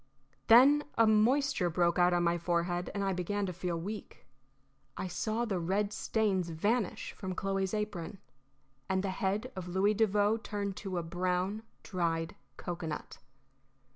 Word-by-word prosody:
Then 270 +6 +7
a 230 - +6
moisture 220 -1 +3
broke 170 +1 +2
out 175 0 +5
on 175 0 +2
my 170 0 +2
forehead, 175 +1 -1
and 200 - -1
I 195 -1 +1
began 195 +3 -1
to 180 - -4
feel 175 -1 -3
weak. 205 +5 -7 0.7
I - - -3
saw 215 +6 -1
the 195 -5 -1
red 200 +4 0
stains 200 -6 0
vanish 205 +6 -1
from 185 -2 -6
Chloe's 195 +1 -1
apron, 210 -3 -4 0.7
and 190 0 +1
the 195 - -1
head 200 +6 -1
of 185 -1 -5
Louis 190 +4 +2
Devoe 210 0 +2
turn 205 -3 -4
to 190 -2 -5
a 170 - -1
brown, 180 +4 -1 0.2
dried 165 -2 -1 0.2
cocoanut. 170 -3 -5
190 Hz, 150 wpm, -32 LUFS, 175-210 Hz, 0.7 s, Then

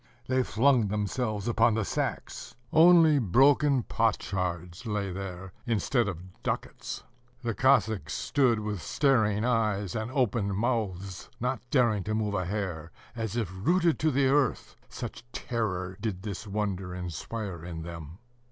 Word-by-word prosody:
They 130 +1 +2
flung 125 -1 +3
themselves 105 +1 -2
upon 115 -1 +3
the 110 -2 0
sacks: - - -3 0.2
only 160 -2 +7
broken 135 - +4
potsherds 90 -3 -1
lay 105 -3 -1
there 95 0 -6
instead 120 +1 +1
of 90 -1 -7
ducats. - - -4 0.4
The 115 -1 -1
Cossacks 110 - +2
stood 125 -6 +2
with 105 -4 -3
staring 110 - +2
eyes 105 -6 +1
and 110 +1 -3
open 115 -6 0
mouths, 100 -5 -2
not 125 0 -1
daring 115 -7 +3
to 110 - -1
move 105 -2 -1
a 95 -3 -1
hair, 90 -5 -3 0.3
as 110 -2 -3
if 110 -6 -1
rooted 170 - +2
to 155 - +2
the 140 -1 +2
earth, 135 -2 +1
such - - -7
terror 95 -6 -2
did 100 -5 -3
this 105 0 -5
wonder 95 -3 -2
inspire 90 +1 -5
in 85 -2 -6
them. 85 -1 -8
105 Hz, 140 wpm, -28 LUFS, 95-120 Hz, 0.4 s, only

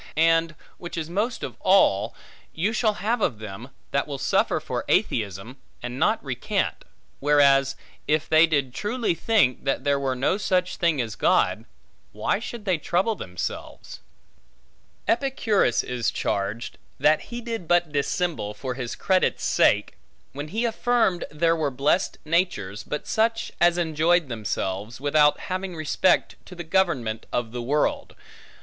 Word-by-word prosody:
And, 165 0 +3 0.2
which 175 0 -7
is 165 0 -4
most 220 +6 -1
of - - -5
all, 115 - +3 0.4
you 200 +7 0
shall 215 -2 +1
have 230 +1 +1
of 120 - +1
them, 110 +3 -8 0.2
that 140 - 0
will 140 -2 -4
suffer - - +1
for - - -4
atheism, 105 +4 -1 0.3
and 125 +1 -5
not - - +1
recant; - - -2 0.3
whereas 140 -2 +4 0.3
if 155 0 +1
they 160 +1 +6
did 140 -5 0
truly 220 - -1
think, 180 - +2
that 135 - 0
there 140 -1 +2
were 135 -2 -1
no 140 +10 0
such 185 -2 0
thing 170 -5 +1
as 115 -3 -2
God, - - +2 0.5
why - - 0
should 225 -1 -7
they 185 -5 +1
trouble 185 +8 +1
themselves? 90 - -6 1.1
Epicurus 225 - +1
is 120 -2 -1
charged, 100 +4 -3 0.2
that 150 +3 +3
he 240 - -5
did 230 -7 -5
but 175 -2 +2
dissemble 145 - -1
for 130 +3 -4
his 125 -2 -5
credit's 185 -1 +1
sake, - - +2 0.4
when 145 +2 -5
he 220 +8 -1
affirmed 230 -5 +1
there 165 +2 +1
were 155 -3 0
blessed 140 +7 0
natures, 155 - 0
but 150 - -5
such 225 +1 0
as 175 0 +5
enjoyed 165 -1 +2
themselves, 105 -1 -3
without 150 +1 +3
having 185 -1 -4
respect 155 +3 +1
to 180 - -12
the 175 - -6
government 160 -11 0
of 120 -2 -2
the 120 0 -4
world. 145 +5 -1
155 Hz, 150 wpm, -25 LUFS, 130-185 Hz, 1.1 s, they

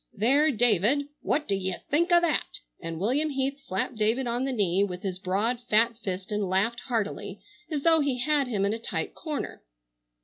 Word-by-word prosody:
There, 275 +9 +4
David, 245 - +2
what 300 +1 0
do 200 - +1
ye 190 -2 -1 0.2
think 340 +5 +2
o' 345 - +7
that?" 340 -3 0 0.2
and 165 -1 -5
William 265 - +1
Heath 275 0 -2
slapped 230 -2 -3
David 225 +5 +1
on 240 +2 -1
the 270 - -1
knee 200 -5 +2
with 180 -2 -4
his 185 -2 -3
broad, 205 +6 0
fat 230 +2 +4
fist 190 +2 -4
and 205 -2 -1
laughed 205 +6 +1
heartily, 225 -5 -2 0.3
as 295 -4 -2
though 325 -1 +5
he 280 -4 0
had 285 +1 +1
him 205 -5 0
in 200 - +1
a 225 - -4
tight - - -4
corner. 305 -3 -5
235 Hz, 195 wpm, -27 LUFS, 200-280 Hz, 0.3 s, o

